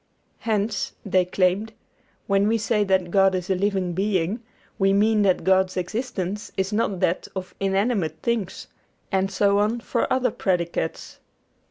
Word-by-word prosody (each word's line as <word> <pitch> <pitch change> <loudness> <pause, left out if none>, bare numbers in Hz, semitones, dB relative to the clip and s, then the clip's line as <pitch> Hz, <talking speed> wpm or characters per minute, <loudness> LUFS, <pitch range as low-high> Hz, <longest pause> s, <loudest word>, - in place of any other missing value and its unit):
Hence, 210 -2 -1
they 185 -2 +2
claimed, 185 +4 0 0.5
when 200 0 +2
we 225 +1 +2
say 210 0 +1
that 190 -2 +1
God 195 0 +4
is 185 +1 -3
a - - +3
living 190 -2 0
being, 195 +2 0 0.4
we 195 0 +3
mean 210 +1 +3
that 190 -3 +2
God's 190 0 +2
existence 205 0 -3
is 190 +2 -1
not 210 -3 0
that 170 - 0
of 185 -1 -5
inanimate 195 -4 0
things; 225 -6 -2 0.5
and 190 -1 +1
so 200 +1 +3
on 215 +3 +1
for - - -1
other 255 -2 +2
predicates. 175 -4 -2
195 Hz, 150 wpm, -24 LUFS, 185-210 Hz, 0.5 s, God